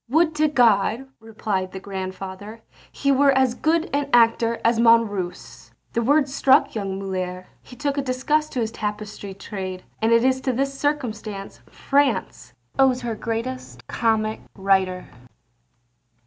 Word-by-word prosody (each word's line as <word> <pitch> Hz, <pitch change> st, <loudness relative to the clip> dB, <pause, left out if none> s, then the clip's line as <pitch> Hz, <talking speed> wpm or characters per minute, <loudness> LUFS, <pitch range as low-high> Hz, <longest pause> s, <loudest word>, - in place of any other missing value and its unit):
"Would 320 Hz, +4 st, +3 dB
to 310 Hz, 0 st, +4 dB
God," 235 Hz, -2 st, +3 dB
replied 210 Hz, -4 st, -3 dB
the 190 Hz, -, -5 dB
grandfather, 195 Hz, +3 st, -7 dB, 0.3 s
"he 280 Hz, -, 0 dB
were 275 Hz, +1 st, +4 dB
as 260 Hz, -2 st, +2 dB
good 320 Hz, +5 st, +1 dB
an 285 Hz, 0 st, -1 dB
actor 230 Hz, -1 st, +3 dB
as 230 Hz, 0 st, +3 dB
Monrose." 215 Hz, -6 st, +1 dB, 0.2 s
The 235 Hz, -, +1 dB
words 280 Hz, +2 st, +2 dB
struck 270 Hz, -1 st, +4 dB
young 195 Hz, -3 st, -3 dB
Molière, 185 Hz, -1 st, -4 dB, 0.2 s
he 250 Hz, -, -14 dB
took 285 Hz, +2 st, -2 dB
a -, -, +1 dB
disgust 275 Hz, +4 st, 0 dB
to 250 Hz, -, -1 dB
his 220 Hz, -1 st, -2 dB
tapestry 210 Hz, -2 st, -5 dB
trade, 190 Hz, -2 st, -6 dB, 0.2 s
and 225 Hz, +1 st, +2 dB
it 230 Hz, 0 st, +5 dB
is 260 Hz, 0 st, +2 dB
to 260 Hz, -, -1 dB
this 275 Hz, +3 st, -1 dB
circumstance 220 Hz, -, -3 dB
France 280 Hz, 0 st, 0 dB, 0.3 s
owes 260 Hz, -2 st, +4 dB
her 235 Hz, -1 st, -3 dB
greatest 225 Hz, -, -5 dB
comic 220 Hz, -2 st, 0 dB, 0.2 s
writer. 190 Hz, -2 st, +1 dB
230 Hz, 145 wpm, -23 LUFS, 195-265 Hz, 0.3 s, it